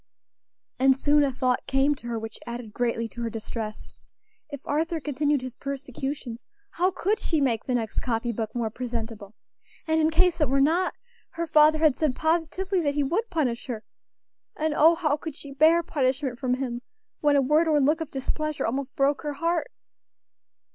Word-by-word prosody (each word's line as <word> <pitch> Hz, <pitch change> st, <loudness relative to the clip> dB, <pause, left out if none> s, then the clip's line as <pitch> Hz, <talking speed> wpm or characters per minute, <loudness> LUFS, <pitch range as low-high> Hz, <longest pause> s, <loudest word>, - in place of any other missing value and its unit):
And 265 Hz, 0 st, +5 dB
soon 290 Hz, +1 st, +4 dB
a 275 Hz, -, +1 dB
thought 255 Hz, -1 st, 0 dB
came 270 Hz, +2 st, +3 dB
to 255 Hz, -4 st, -10 dB
her 235 Hz, -1 st, -2 dB
which 225 Hz, 0 st, -7 dB
added 235 Hz, -2 st, -6 dB
greatly 230 Hz, -1 st, -1 dB
to 240 Hz, -, -8 dB
her 230 Hz, -, -1 dB
distress. 220 Hz, -1 st, -6 dB, 0.6 s
If 285 Hz, -2 st, -6 dB
Arthur 325 Hz, +3 st, 0 dB
continued 290 Hz, -1 st, 0 dB
his 255 Hz, -2 st, -5 dB
persecutions, 270 Hz, -2 st, -5 dB, 0.3 s
how 360 Hz, +2 st, +2 dB
could 385 Hz, +3 st, 0 dB
she 320 Hz, -, 0 dB
make 240 Hz, -6 st, +1 dB
the 255 Hz, -, 0 dB
next 225 Hz, -3 st, -1 dB
copy 235 Hz, -1 st, -1 dB
book 225 Hz, 0 st, -4 dB
more 230 Hz, -2 st, -1 dB
presentable? 225 Hz, -4 st, -5 dB, 0.5 s
and 320 Hz, 0 st, +2 dB
in 310 Hz, -, +4 dB
case 350 Hz, +1 st, +2 dB
it 300 Hz, -, +3 dB
were 275 Hz, +1 st, +2 dB
not, 330 Hz, +7 st, +2 dB, 0.4 s
her 335 Hz, 0 st, -2 dB
father 310 Hz, -1 st, +5 dB
had 310 Hz, -4 st, +4 dB
said 300 Hz, -5 st, 0 dB
positively 345 Hz, +4 st, 0 dB
that 285 Hz, -3 st, 0 dB
he 290 Hz, -, +2 dB
would 415 Hz, +12 st, -1 dB
punish 270 Hz, -9 st, -1 dB
her; 225 Hz, -4 st, -4 dB, 0.7 s
and 310 Hz, 0 st, 0 dB
oh! 325 Hz, +3 st, +6 dB
how 305 Hz, -3 st, +1 dB
could 310 Hz, -1 st, -7 dB
she 285 Hz, -2 st, -10 dB
bear 320 Hz, +4 st, +5 dB
punishment 265 Hz, -4 st, -1 dB
from 250 Hz, -2 st, +1 dB
him, 250 Hz, -2 st, -4 dB, 0.4 s
when 295 Hz, -1 st, +3 dB
a 280 Hz, -, +5 dB
word 305 Hz, +5 st, +3 dB
or 305 Hz, -2 st, +4 dB
look 300 Hz, +4 st, +2 dB
of 320 Hz, -, -4 dB
displeasure 305 Hz, +3 st, -2 dB
almost 265 Hz, +4 st, -3 dB
broke 280 Hz, 0 st, +2 dB
her 295 Hz, -1 st, -3 dB
heart? 335 Hz, +2 st, -1 dB
280 Hz, 185 wpm, -26 LUFS, 245-315 Hz, 0.7 s, oh